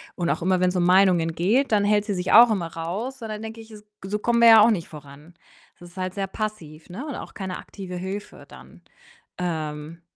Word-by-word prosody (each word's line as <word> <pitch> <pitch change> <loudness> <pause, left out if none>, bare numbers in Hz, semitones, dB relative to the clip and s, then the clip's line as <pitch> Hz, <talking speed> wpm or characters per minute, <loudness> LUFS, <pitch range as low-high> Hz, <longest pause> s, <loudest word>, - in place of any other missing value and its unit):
und 175 -2 -2
auch - - -1
immer, 185 +1 +1
wenn's 180 0 +1
um 175 - +1
Meinungen 180 -3 +3
geht, 225 - +1
dann 205 -1 +3
hält 205 0 +2
sie 205 - -2
sich 180 +1 -2
auch 235 +1 +9
immer 175 -5 -3
raus 220 +11 -5
und 225 - -6
dann 215 0 -6
denke 225 0 -8
ich: 220 0 -16
„Es 210 -1 -13 0.2
g 190 - -8
so 210 - -1
kommen 235 +2 +1
wir 235 - +7
ja 220 -1 +9
auch 230 +2 +5
nicht 175 -6 -2
voran.“ 150 +2 -14 0.5
Das 175 0 -13
ist 180 - -22
halt 185 0 -3
sehr 195 -1 -3
passiv, 180 -7 -7
ne, 240 +12 -7
und 285 - -6
auch - - -9
keine 190 -2 -6
aktive 185 -3 -9
Hilfe 195 +3 -7
dann. - - -16 0.6
Ähm, 160 -1 -5
190 Hz, 235 wpm, -23 LUFS, 170-215 Hz, 0.6 s, auch